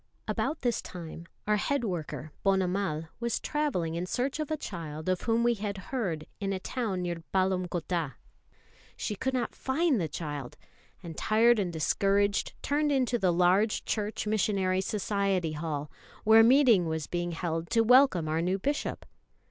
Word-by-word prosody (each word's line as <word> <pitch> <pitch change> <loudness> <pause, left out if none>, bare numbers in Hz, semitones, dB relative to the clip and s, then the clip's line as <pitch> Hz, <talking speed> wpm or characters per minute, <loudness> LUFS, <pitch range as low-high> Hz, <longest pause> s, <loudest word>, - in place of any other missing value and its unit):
About 315 - -1
this 240 -2 +1
time 170 -1 -9 0.2
our 210 0 +2
head 280 +4 0
worker, 165 -6 -4
Ponnamal, 185 -4 0
was 235 0 -1
travelling 285 - -1
in 175 +2 -3
search 260 - -1
of 305 - -2
a 310 - -1
child 160 - -6
of 185 -1 +1
whom 230 0 +1
we 240 0 +4
had 205 -2 -4 0.2
heard 175 -12 -1
in 195 -1 -2
a 190 - -2
town 200 -4 -2
near 170 -1 -3
Palamcottah. 180 -5 0 0.8
She - - -2
could 260 +4 -2
not 250 - -1
find 270 - +1
the 165 - 0
child, 145 -5 -6 0.5
and, 165 -2 -7
tired 225 +5 +4
and 185 -3 -1
discouraged, 200 +5 +1
turned 295 +1 +1
into 250 -3 +1
the 185 -3 +3
large 180 +5 +2
Church 215 0 -2
Missionary 195 -3 +1
Society 195 -4 0
hall, 150 -1 -4 0.3
where 220 +1 +7
a - - +9
meeting 235 - +5
was 160 -1 -2
being 175 0 -3
held 165 0 -3
to 230 - +3
welcome 245 - +5
our 160 +1 0
new 185 +3 +1
Bishop. 285 +9 -2
195 Hz, 165 wpm, -29 LUFS, 170-230 Hz, 0.8 s, a